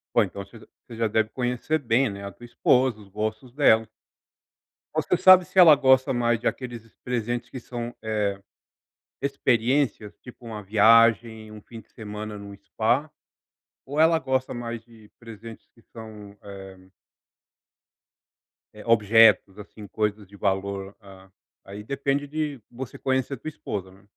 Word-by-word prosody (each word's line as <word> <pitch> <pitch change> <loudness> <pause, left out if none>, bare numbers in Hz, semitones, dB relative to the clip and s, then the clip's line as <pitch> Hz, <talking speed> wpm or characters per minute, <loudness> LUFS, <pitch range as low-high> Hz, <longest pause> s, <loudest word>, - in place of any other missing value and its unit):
Bom, 120 - +6
então 100 0 -7
você 110 +3 -15
j - - -17 0.2
você 115 - -10
já 115 0 0
deve 110 +1 0
conhecer 125 +6 -2
bem, 125 +1 +1
né, 100 0 -8
a 100 - -6
tua 120 - -14
esposa, 120 -1 +1
os 100 - -15
gostos 110 +4 -4
dela. 115 -6 +3 1.1
Você - - +1
sabe 185 -1 +7
se 190 - -13
ela 170 -4 +9
gosta 130 -1 +3
mais 120 -1 +1
de 120 - -2
aqueles 120 -3 -5 0.2
presentes 120 0 -3
que 130 - -8
são, 120 0 -7
eh, 110 -1 -2 1.0
experiências 130 -4 0
tipo 125 -1 -14
uma 110 -2 -7
viagem, 110 +1 +3
um 105 -1 -11
fim 115 +1 -12
de - - -19
semana 105 -1 -8
no 100 0 -10
spa? 120 +9 -1 0.8
Ou 145 +3 -6
ela 165 +1 +5
gosta 130 -1 -2
mais 120 -1 -5
de 110 -3 -19
presentes 115 -1 -12
que 115 - -23
são, 105 -3 -12
eh 95 -2 -12 1.9
eh, 105 - -12
objetos 110 -2 +4
assim, 105 0 -11
coisas 105 -1 -3
de 100 - -16
valor? 100 0 -2
Ah, 95 -1 -16 0.4
aí 100 +2 -9
depende 140 +3 -2
de 150 -3 -4
você 125 +1 -8
conhecer 130 +1 -1
a - - -14
tua 145 - -11
esposa, 100 -11 -6
né. 95 +1 -20
115 Hz, 155 wpm, -25 LUFS, 105-130 Hz, 1.9 s, ela